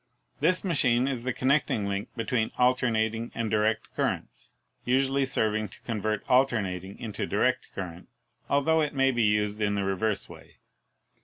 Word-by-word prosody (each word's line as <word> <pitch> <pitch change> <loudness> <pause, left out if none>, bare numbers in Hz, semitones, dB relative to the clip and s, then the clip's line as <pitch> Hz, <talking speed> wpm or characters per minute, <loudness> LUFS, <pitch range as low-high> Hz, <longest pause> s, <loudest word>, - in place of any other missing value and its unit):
This 180 +5 +2
machine 130 -8 +2
is 125 -3 -3
the 130 - +1
connecting 130 -5 +1
link 100 0 -3
between 115 -1 0
alternating 115 -2 +1
and 115 -2 -2
direct 110 0 0
currents, - - -3 0.3
usually 135 +2 +2
serving 110 -4 0
to - - -15
convert 110 -2 -2
alternating 100 -8 +1
into 110 -4 -4
direct - - +1
current, 90 -2 -7 0.4
altho 150 +3 +3
it 150 -1 -1
may 135 0 +3
be 120 -2 0
used 105 0 +1
in 105 -1 +1
the 100 - 0
reverse 95 +2 -1
way. - - -14
115 Hz, 150 wpm, -27 LUFS, 105-130 Hz, 0.4 s, altho